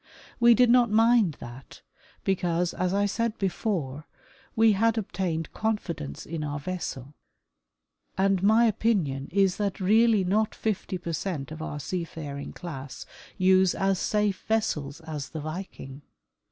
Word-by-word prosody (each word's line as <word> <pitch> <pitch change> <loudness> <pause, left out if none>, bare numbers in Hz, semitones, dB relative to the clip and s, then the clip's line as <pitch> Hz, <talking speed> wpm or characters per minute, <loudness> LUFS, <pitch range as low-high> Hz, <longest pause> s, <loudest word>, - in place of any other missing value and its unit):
We 235 -1 +7
did 245 0 +5
not 245 -2 +5
mind 220 -6 +4
that, 120 +2 -11 0.4
because, 175 -2 0
as 180 0 -1
I 200 +1 +2
said 230 +2 -1
before, 170 - -2 0.5
we 225 0 +5
had 225 +3 +2
obtained 180 -6 -3
confidence 180 - -3
in 160 -1 -4
our 145 0 -3
vessel, 145 -5 -5 1.0
and 195 -1 +2
my 220 +4 +5
opinion 185 -12 0
is 195 0 +2
that 200 -2 -2
really 215 +2 +4
not 215 +4 +1
fifty 200 -3 -2
per 170 -1 -5
cent 155 -5 -3
of 155 0 -7
our 150 -2 -5
seafaring 150 -3 -5
class 135 -6 -8 0.3
use 185 0 +4
as 195 -1 +1
safe 210 -2 0
vessels 155 -10 -1
as 155 -3 -6
the 160 - -6
Viking. 155 -4 -7
185 Hz, 140 wpm, -27 LUFS, 155-210 Hz, 1.0 s, We